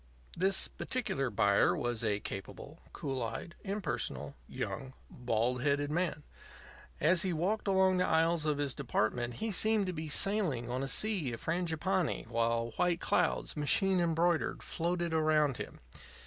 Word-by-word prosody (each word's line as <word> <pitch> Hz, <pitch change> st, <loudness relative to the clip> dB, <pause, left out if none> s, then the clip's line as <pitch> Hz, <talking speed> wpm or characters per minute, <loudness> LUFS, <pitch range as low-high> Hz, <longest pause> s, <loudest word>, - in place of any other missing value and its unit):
This 190 Hz, +2 st, +1 dB
particular 135 Hz, -, -2 dB
buyer 100 Hz, -2 st, +3 dB
was 120 Hz, -2 st, -2 dB
a 105 Hz, -2 st, +1 dB
capable, 140 Hz, -, -8 dB
cool 135 Hz, -5 st, -4 dB
eyed, 115 Hz, +9 st, -4 dB
impersonal, 125 Hz, -, -3 dB, 0.2 s
young, 130 Hz, -1 st, -4 dB, 0.2 s
bald 125 Hz, +1 st, 0 dB
headed 145 Hz, +1 st, +1 dB
man. 165 Hz, -2 st, -1 dB, 0.8 s
As 170 Hz, +4 st, +4 dB
he 185 Hz, -, 0 dB
walked 195 Hz, +7 st, -1 dB
along 190 Hz, -1 st, +4 dB
the 180 Hz, -, +2 dB
aisles 160 Hz, 0 st, +2 dB
of 150 Hz, -1 st, +1 dB
his 145 Hz, -3 st, -1 dB
department 120 Hz, -2 st, -1 dB
he 225 Hz, 0 st, -2 dB
seemed 215 Hz, +1 st, +2 dB
to 185 Hz, -, -3 dB
be 155 Hz, -1 st, -5 dB
sailing 150 Hz, -, +1 dB
on 130 Hz, +1 st, -1 dB
a 135 Hz, -, -2 dB
sea 175 Hz, -, 0 dB
of 115 Hz, -, -7 dB
frangipanni, 175 Hz, +1 st, 0 dB
while 115 Hz, 0 st, 0 dB
white 175 Hz, -1 st, +2 dB
clouds, -, -, +1 dB
machine 185 Hz, +6 st, +3 dB
embroidered, 170 Hz, 0 st, +1 dB
floated 170 Hz, 0 st, -1 dB
around 155 Hz, -4 st, +3 dB
him. -, -, -7 dB
155 Hz, 150 wpm, -32 LUFS, 125-180 Hz, 0.8 s, As